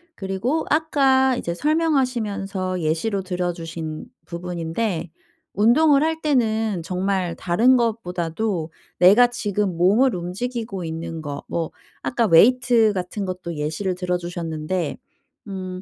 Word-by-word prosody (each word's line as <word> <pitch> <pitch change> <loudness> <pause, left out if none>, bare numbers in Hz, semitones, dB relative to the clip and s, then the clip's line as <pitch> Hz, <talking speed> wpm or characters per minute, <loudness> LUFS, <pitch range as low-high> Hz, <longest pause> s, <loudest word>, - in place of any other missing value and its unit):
그리고 200 +11 -2
아까 270 -4 +3
이제 170 -7 -3
설명하시면서 220 - 0
예시로 170 +6 0
들어주신 170 -3 -4 0.2
부분인데 170 +1 -3 0.4
운동을 275 +8 +4
할 320 0 -1
때는 225 - +1
정말 185 0 -1
다른 225 +9 +3
것보다도 180 -5 -2 0.3
내가 200 +8 +7
지금 205 -6 -2
몸을 215 +9 +4
움직이고 195 +3 -4
있는 165 0 -5
거 145 -2 -6
뭐 165 -2 -3 0.3
아까 240 -2 0
웨이트 230 +4 +5
같은 190 +2 -3
것도 180 -2 -5
예시를 160 +6 -2
들어 180 0 -1
주셨는데 170 -1 -3 0.5
음 185 -2 -6
190 Hz, 270 characters per minute, -22 LUFS, 170-235 Hz, 0.5 s, 내가